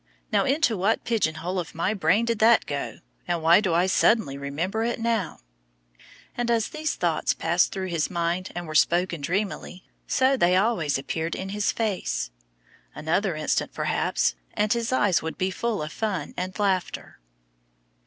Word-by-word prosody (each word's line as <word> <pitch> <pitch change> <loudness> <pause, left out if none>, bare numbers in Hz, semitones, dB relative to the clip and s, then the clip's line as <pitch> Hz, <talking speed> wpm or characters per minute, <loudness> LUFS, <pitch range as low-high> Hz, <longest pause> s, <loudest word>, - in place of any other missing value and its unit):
"Now - - +3
into 275 -4 +2
what 200 +4 +1
pigeon 210 -9 0
hole 180 +4 -3
of 170 - -6
my 170 +6 0
brain 200 +3 +2
did 230 -2 -1
that 225 +1 +5
go, 140 -1 -4 0.3
and 170 -2 -1
why 170 +5 +6
do 185 -6 0
I 175 +2 +3
suddenly 190 -5 +3
remember 155 +10 -2
it 235 0 -1
now?" 225 - -1 0.9
And 240 -1 -1
as 230 -2 +1
these 310 0 -2
thoughts - - 0
passed - - +2
through 190 -1 -4
his 165 -3 0
mind 175 +1 -1
and 175 0 -4
were 155 - -7
spoken 170 +1 +2
dreamily, 185 +2 -3 0.2
so 265 +1 +3
they 180 -7 +3
also 185 - +1
appeared 160 +4 -3
in 190 - -5
his 205 +1 0
face. 190 - -2 0.6
Another 170 +4 0
instant, 155 -1 -1
perhaps, - - 0 0.2
and 210 +1 +2
his 235 0 -2
eyes 205 -8 +3
would 160 0 -5
be 185 +1 0
full 220 -3 -2
of 155 - -6
fun 210 -3 -3
and 185 +1 -4
laughter. 195 -3 -1
185 Hz, 170 wpm, -25 LUFS, 165-220 Hz, 0.9 s, why